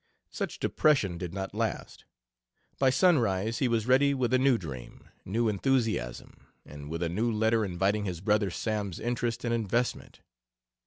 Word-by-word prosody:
Such - - -4
depression 105 - +1
did 90 -1 -5
not 95 +1 -5
last; 110 0 -4 0.7
by 135 - +4
sunrise 115 - +2
he 130 - +2
was 115 -2 0
ready 135 +3 +4
with 130 -1 0
a 130 - +4
new 130 -2 +4
dream, 65 - -9 0.2
new 115 +5 0
enthusiasm, 110 - -1 0.2
and 75 0 -10
with 85 +2 -3
a - - 0
new 110 +7 0
letter 110 +1 +2
inviting 100 +2 0
his 90 -4 -4
"brother 105 +1 +1
Sam's" 100 -1 -3
interest 120 0 -2
and 115 - 0
investment. 115 +2 -2
110 Hz, 155 wpm, -29 LUFS, 95-120 Hz, 0.7 s, by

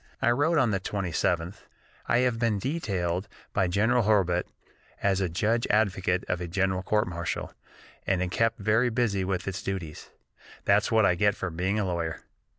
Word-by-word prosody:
I 120 - +3
wrote 145 +7 +2
on 125 -6 +3
the 95 - 0
27th: 90 -2 -1 0.5
"I - - +3
have 120 -2 0
been 115 -3 +1
detailed 100 - -2 0.3
by 95 -2 +2
General 110 +7 +2
Hurlbut 95 -5 +2 0.6
as 100 -1 +2
judge 110 +7 0
advocate 95 -4 +1
of 90 - -2
a 90 - -3
general 95 +1 0
court 105 +2 +1
martial, 85 -1 -4 0.5
and 95 - +2
am 90 - -3
kept 115 +4 +1
very 110 +3 +2
busy 110 -5 0
with 95 0 -2
its 95 0 -3
duties. 90 -6 -5 0.6
That's 100 +2 +3
what 110 -2 +4
I 90 - +4
get 105 +3 +2
for 95 - -4
being 95 +5 -1
a 105 - 0
lawyer." 85 -3 -3
100 Hz, 170 wpm, -27 LUFS, 90-110 Hz, 0.6 s, what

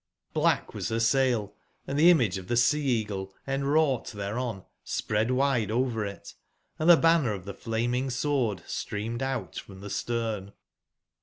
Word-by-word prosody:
Black - - +1
was - - -3
her 115 - 0
sail, 115 -4 +2 0.3
and 135 - -4
the 165 +3 +8
image 120 - +3
of 90 - -11
the 120 - 0
Sea/eagle 115 -8 +1
en 135 0 -1
wrought 145 -3 +2
thereon 105 0 -4 0.2
spread 105 +2 -1
wide 130 -5 +2
over 115 -1 0
it; 100 - -9 0.5
and 155 +2 +2
the 170 - +10
banner 165 -9 +3
of 95 -3 -7
the 100 - -6
flaming 120 +5 -1
Sword 125 - 0
streamed 110 +4 -4
out 135 0 -3
from 95 -1 -9
the 100 - -7
stern. 110 -4 -2
120 Hz, 155 wpm, -28 LUFS, 105-135 Hz, 0.5 s, the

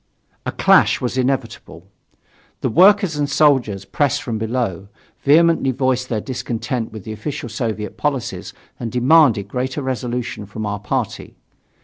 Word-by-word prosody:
A - - 0
clash - - +4
was 125 0 -3
inevitable. 125 -9 -3 0.8
The - - 0
workers 190 - +5
and 145 -1 0
soldiers 130 -10 +2
pressed 145 +3 0
from 115 -6 -3
below, 110 -5 -2 0.3
vehemently 160 -1 +4
voiced 130 -1 0
their 110 - -1
discontent 120 -1 -4
with 110 -3 -9
the 110 - -7
official 120 +3 -5
Soviet 110 -2 -4
policies 140 -5 -3 0.3
and 115 -2 -4
demanded 125 -5 +4
greater 130 +5 -3
resolution 125 -4 -3
from 110 +1 -6
our 105 0 -3
party. 105 - -3
125 Hz, 135 wpm, -20 LUFS, 110-140 Hz, 0.8 s, workers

